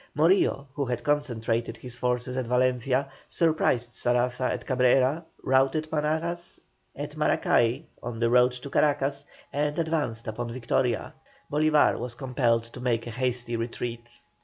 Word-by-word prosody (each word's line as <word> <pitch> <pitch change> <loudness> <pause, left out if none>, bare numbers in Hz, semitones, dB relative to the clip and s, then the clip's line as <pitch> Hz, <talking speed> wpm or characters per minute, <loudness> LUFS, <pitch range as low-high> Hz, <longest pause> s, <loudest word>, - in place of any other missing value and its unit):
Morillo, 155 -3 +3
who 145 - -1
had 120 -1 -3
concentrated 120 -6 -1
his 125 -1 -9
forces 125 0 -1
at 130 -2 -2
Valencia, 130 +2 +1 0.2
surprised 140 -7 +1
Saraza 125 +2 +1
at - - -4
Cabrera, 130 +4 +3 0.2
routed 135 +4 +2
Monagas 160 +3 -2 0.4
at - - -6
Maracay 120 +7 +2 0.2
on 120 -1 -5
the 115 0 +2
road 125 0 +5
to 125 +3 -8
Caracas, 140 -1 +1 0.3
and 145 +1 0
advanced 155 -9 -1
upon 115 +2 -4
Victoria. 120 -1 -1 0.4
Bolívar 150 0 +3
was 120 -1 -5
compelled 120 -2 +1
to 115 +2 -12
make 120 -2 0
a 120 - -5
hasty 120 0 -2
retreat. 115 0 -4
125 Hz, 135 wpm, -27 LUFS, 120-145 Hz, 0.4 s, road